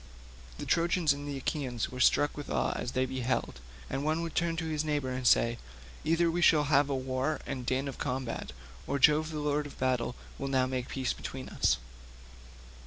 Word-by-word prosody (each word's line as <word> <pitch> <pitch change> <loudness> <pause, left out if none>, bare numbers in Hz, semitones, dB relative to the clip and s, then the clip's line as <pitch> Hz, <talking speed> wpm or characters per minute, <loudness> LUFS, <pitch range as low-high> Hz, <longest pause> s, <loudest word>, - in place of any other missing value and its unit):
The - - -5
Trojans 170 -2 +3
and 145 +1 -6
Achaeans 135 -3 -2
were 125 - -7
struck 145 +3 +4
with 145 - -7
awe - - +1
as 125 - -3
they 130 0 +2
beheld, 130 - -2 0.3
and 135 - -3
one 155 +2 0
would 165 - -4
turn 170 -1 +1
to 165 0 -3
his 155 -1 -1
neighbour, 130 -4 -1
saying, 120 -1 +4 0.5
"Either 165 +1 +3
we 175 +1 -1
shall 155 -2 +6
again 145 0 -2
have 145 +1 +5
war 130 +2 -1
and 130 -3 -5
din 135 +2 0
of 135 - -6
combat, 125 - -3 0.4
or 140 - 0
Jove 150 +3 +5
the 155 - -5
lord 150 0 0
of 145 - -13
battle 125 -2 0 0.2
will 140 - -2
now 130 -1 +2
make 130 -1 -3
peace 130 -2 -1
between 130 0 -7
us." - - +2
140 Hz, 190 wpm, -30 LUFS, 130-155 Hz, 0.5 s, shall